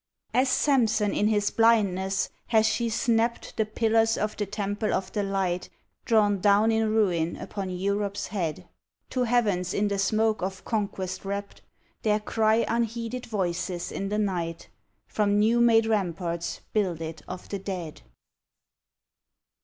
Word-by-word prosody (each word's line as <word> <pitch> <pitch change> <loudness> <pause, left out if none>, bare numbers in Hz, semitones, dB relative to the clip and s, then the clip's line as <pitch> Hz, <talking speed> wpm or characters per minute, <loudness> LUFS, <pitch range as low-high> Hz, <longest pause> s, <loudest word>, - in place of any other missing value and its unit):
As 255 +1 +3
Sampson 230 -7 +2
in 210 - +2
his 205 -1 +1
blindness 195 -4 +2 0.2
hath 220 -2 +4
she 220 +2 +1
snapt 230 +1 0
The 220 -1 0
pillars 225 +1 +2
of 210 0 -2
the 205 - -3
temple 205 +1 -2
of 190 - -3
the 210 - -1
light, 190 -3 -1 0.4
Drawn 205 -3 +3
down 205 +3 +4
in 220 -1 +1
ruin 180 -7 +1
upon 195 -2 -5
Europe 200 +2 -1
s - - -3
head. 175 -6 -3 0.4
To 255 -1 +1
heavens 205 -7 +1
in 205 0 +1
the 200 -1 -1
smoke 220 +2 +1
of 190 +1 -4
conquest 195 -4 -3
wrapt 200 +1 -5 0.4
There 210 -1 +2
cry 220 +1 +2
unheeded 235 +1 -2
voices 180 -3 -2
in 195 - -3
the 210 - -1
night, 175 -5 -2 0.4
From 205 -1 +1
new 225 +3 +3
made 225 -1 +5
ramparts 175 -5 -2
builded 165 -6 -2
of 180 - -7
the 200 - -3
dead. 185 -5 -6
205 Hz, 145 wpm, -26 LUFS, 190-225 Hz, 0.4 s, made